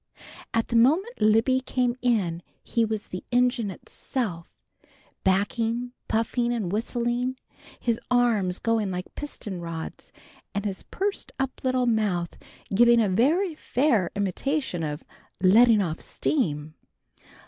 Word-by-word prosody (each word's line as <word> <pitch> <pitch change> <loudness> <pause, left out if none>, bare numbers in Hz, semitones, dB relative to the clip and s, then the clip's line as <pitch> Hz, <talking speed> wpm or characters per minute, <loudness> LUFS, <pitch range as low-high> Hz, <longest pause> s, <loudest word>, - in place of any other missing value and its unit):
At 225 0 0
the 235 - -1
moment 320 - +3
Libby 225 +5 +4
came 250 -1 0
in 195 -9 +1 0.2
he 230 - +1
was 220 -1 -2
the 185 - -6
engine 245 -3 +2
itself, 190 -2 -5 0.7
backing, 225 +5 +1 0.2
puffing 235 +2 0
and 215 -7 -2
whistling, 240 +3 -1 0.4
his 235 -2 0
arms 225 -7 +2
going 225 -3 0
like 180 0 -5
piston 205 -11 -6
rods, 165 -1 -7 0.4
and 200 +1 -2
his 195 -2 -3
pursed 400 +1 -3
up 270 -1 -3
little 255 -1 +2
mouth 205 -7 0 0.4
giving 235 +3 +6
a 220 - +3
very 315 - +2
fair 250 - +1
imitation 205 - -1
of 150 -1 -4 0.4
"letting 215 +3 +6
off 165 -3 -3
steam." 155 - -1
230 Hz, 125 wpm, -26 LUFS, 190-250 Hz, 0.7 s, giving